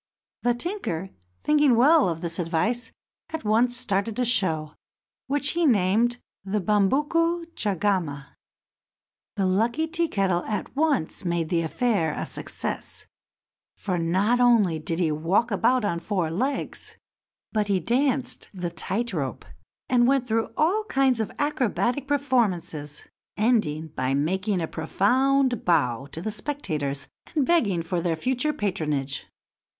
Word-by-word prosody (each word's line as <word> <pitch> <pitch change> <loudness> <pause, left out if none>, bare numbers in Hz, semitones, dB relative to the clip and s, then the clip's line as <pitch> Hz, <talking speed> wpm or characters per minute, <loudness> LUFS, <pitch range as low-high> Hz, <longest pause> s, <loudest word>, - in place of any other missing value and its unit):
The 245 0 +2
tinker, 240 - -3 0.3
thinking 295 -4 +4
well 280 - +5
of 165 -1 -4
this 170 -1 -4
advice, 180 +9 0 0.4
at 320 -4 -5
once 235 +3 +2
started 220 -2 -1
a 250 - +1
show, 165 -10 +1 0.5
which 285 +2 0
he 340 0 0
named 230 - +3 0.3
the 195 +2 -1
Bumbuku 295 - +2
Chagama. 185 -8 -1 1.1
The 195 -3 0
lucky 230 +11 +1
Tea 335 +1 0
kettle 190 - 0
at 215 +4 -4
once 280 - 0
made 170 -2 -1
the 170 -1 +1
affair 165 -1 0
a - - -3
success, - - -4 0.7
for 185 -3 -2
not 190 +9 +2
only 220 -10 +4
did 165 +2 -3
he 170 -3 +1
walk 175 +10 +1
about 245 +4 +2
on 170 -4 -1
four 175 -4 -1
legs, 260 +10 -3 0.5
but 210 -2 0
he 195 -2 +2
danced 255 - 0
the 175 -2 -3
tight 200 +7 -2
rope, 140 -6 -3 0.4
and 245 -1 +4
went 270 -2 +2
through 225 0 0
all 375 +8 +2
kinds 265 - +2
of 220 - -2
acrobatic 265 -1 0
performances, 185 - 0 0.3
ending 185 -9 +1
by 130 -1 -1
making 190 +6 0
a 165 - -1
profound 250 +10 +1
bow 135 -7 +1
to 160 +4 -6
the 215 - -2
spectators, 175 - -3 0.3
and 290 -4 +3
begging 210 - +2
for 170 +1 -2
their 165 -1 0
future 255 - 0
patronage. 150 - -2
210 Hz, 135 wpm, -25 LUFS, 170-255 Hz, 1.1 s, well